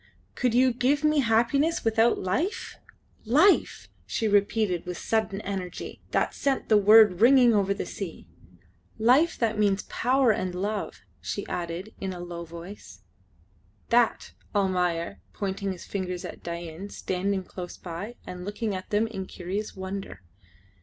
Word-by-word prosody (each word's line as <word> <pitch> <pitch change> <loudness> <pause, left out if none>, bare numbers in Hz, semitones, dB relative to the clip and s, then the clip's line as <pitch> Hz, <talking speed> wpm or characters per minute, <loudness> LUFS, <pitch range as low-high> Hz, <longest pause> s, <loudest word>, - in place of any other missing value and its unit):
"Could 245 -2 0
you 255 0 +4
give 275 +5 +1
me 305 -1 +3
happiness 255 +7 +2
without 225 +1 +3
life? 350 - -2 0.5
Life!" 310 - +3 0.2
she 225 - -1
repeated 205 -3 +2
with 180 -1 -5
sudden 220 -3 -1
energy 190 -3 -5
that - - 0
sent 275 -2 -1
the 215 - +6
word 210 -2 +6
ringing 245 -1 +7
over 200 -2 +2
the 200 - -2
sea. 185 -5 -7 0.7
"Life 260 +9 +4
that 220 -2 0
means 205 -2 +2
power 255 0 +2
and 185 -3 -2
love," 205 +3 -3 0.2
she - - -4
added 175 +4 -5
in 190 -1 -3
a 180 - -8
low 175 -1 -6
voice. 170 +5 -11 0.9
"That!" 235 -1 +2
said - - -7
Almayer, 180 -2 0
pointing 195 0 -3
his 180 -2 -8
finger 185 -2 -3
at - - -10
Dain 170 +2 -6
standing 190 0 -2
close 180 -1 -8
by 185 +7 -7
and 180 0 -7
looking 205 +2 -3
at 185 -1 -6
them 210 +2 +2
in 195 -4 -6
curious 195 +4 -5
wonder. 190 - -6
200 Hz, 145 wpm, -27 LUFS, 185-230 Hz, 0.9 s, ringing